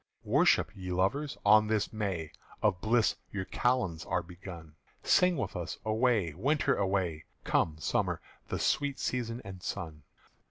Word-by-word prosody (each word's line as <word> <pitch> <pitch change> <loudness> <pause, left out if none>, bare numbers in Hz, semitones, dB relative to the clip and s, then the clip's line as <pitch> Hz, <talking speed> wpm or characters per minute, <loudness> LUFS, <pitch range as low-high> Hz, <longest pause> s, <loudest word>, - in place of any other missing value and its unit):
"_Worship, - - +4
ye 95 -3 -6
lovers, 100 +12 0
on 110 +1 +7
this 105 -1 0
May: 95 -8 -2 0.3
Of 90 - +2
bliss 115 +1 +2
your 100 -2 -3
kalends 110 -11 0
are 90 - -1
begun: 85 -2 -10 0.3
Sing 180 -2 +4
with - - -3
us, 85 -2 -4
Away, 110 - +2
Winter, 145 - +1
away! 95 -5 -1 0.2
Come, 80 -1 +1
Summer, 80 - 0 0.3
the - - -2
sweet 145 -2 +1
season 120 -1 -2
and 95 -2 -8
sun! 80 -3 -5
100 Hz, 145 wpm, -31 LUFS, 90-120 Hz, 0.3 s, on